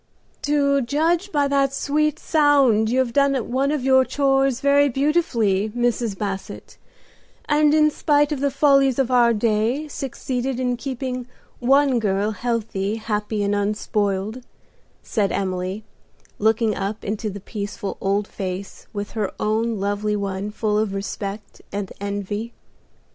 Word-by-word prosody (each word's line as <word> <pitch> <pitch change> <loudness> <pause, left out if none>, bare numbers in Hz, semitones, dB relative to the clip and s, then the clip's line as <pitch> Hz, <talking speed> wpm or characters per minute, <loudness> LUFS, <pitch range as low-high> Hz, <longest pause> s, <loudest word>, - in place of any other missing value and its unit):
"To 280 -1 +2
judge 325 +9 0
by 290 -2 +2
that 275 -1 +1
sweet 305 +2 0
sound 280 -10 +3
you 250 - +1
have 255 -3 +1
done 280 0 +3 0.2
one 270 +2 +1
of 300 -4 -1
your 260 0 +5
'chores' 270 -2 +1
very 280 +1 +4
beautifully, 235 - +1
Mrs. 240 -4 0
Basset, 195 -1 -5 0.7
and 300 0 +4
in 305 0 +4
spite 295 0 +2
of 295 - -1
the 280 +1 +1
follies 275 -2 +3
of 265 -2 +1
our 240 -2 +5
day, 230 +6 0
succeeded 265 -2 -3
in 250 -1 0
keeping 255 -1 -4 0.3
one 270 0 +3
girl 205 0 0
healthy, 220 -3 -2
happy 210 -1 -2
and 200 0 0
unspoiled," 205 +1 -1 0.6
said 205 -5 0
Emily, 185 +2 -2 0.6
looking 220 +1 +2
up 200 +2 -4
into 215 +1 -2
the 200 0 -7
peaceful 200 0 -5
old 200 +1 0
face 190 0 -6
with 205 0 -4
her 215 -4 -2
own 220 0 0
lovely 205 +1 -1
one 200 0 -3
full 210 0 0
of 210 -2 -1
respect 200 +1 -6
and 200 -1 -4
envy. 205 +3 -4
230 Hz, 140 wpm, -22 LUFS, 205-275 Hz, 0.7 s, your